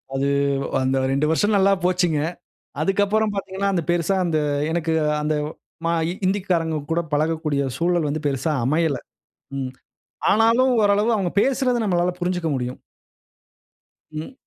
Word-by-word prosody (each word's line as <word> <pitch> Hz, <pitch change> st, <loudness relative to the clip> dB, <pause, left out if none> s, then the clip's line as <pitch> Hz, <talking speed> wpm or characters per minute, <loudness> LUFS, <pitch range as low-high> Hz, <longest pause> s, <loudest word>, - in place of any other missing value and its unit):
அது 135 Hz, +1 st, 0 dB, 0.5 s
அந்த 130 Hz, +1 st, +1 dB
2 140 Hz, +2 st, +1 dB
வருஷ 160 Hz, +6 st, +2 dB
நல்லா 195 Hz, +1 st, +4 dB
போச்சுங்க. 180 Hz, -4 st, +2 dB, 0.6 s
அதுக்கு 195 Hz, +5 st, +2 dB
அப்பறம் 215 Hz, +1 st, +1 dB
பார்த்தீங்கனா 195 Hz, 0 st, -2 dB
அந்த 170 Hz, -, +1 dB
பெருசா 175 Hz, +2 st, +1 dB
அந்த 165 Hz, -2 st, +1 dB, 0.3 s
எனக்கு 165 Hz, -1 st, -1 dB, 0.3 s
அந்த 155 Hz, 0 st, 0 dB, 0.5 s
ம -, -, +1 dB, 0.2 s
ஹி -, -, -1 dB
ஹிந்திகாரங்க 180 Hz, -5 st, 0 dB
கூட 165 Hz, +1 st, +2 dB
பழகக்கூடிய 155 Hz, -1 st, 0 dB
சூழல் 175 Hz, -2 st, +1 dB
வந்து 155 Hz, +1 st, -3 dB
பெருசா 145 Hz, +3 st, 0 dB
அமையல. 150 Hz, 0 st, +1 dB, 0.6 s
ம். 130 Hz, -1 st, -3 dB, 0.6 s
ஆனாலும் 230 Hz, +4 st, +4 dB
ஓரளவு 205 Hz, +3 st, +3 dB
அவுங்க 190 Hz, -4 st, -1 dB
பேசுறத 260 Hz, -1 st, +1 dB
நம்மளால 180 Hz, -2 st, +1 dB
புருஞ்சுக்க 180 Hz, -2 st, -1 dB
முடியும். 125 Hz, -1 st, -4 dB, 1.3 s
ம். 155 Hz, +12 st, -6 dB
175 Hz, 135 wpm, -22 LUFS, 155-195 Hz, 1.3 s, நல்லா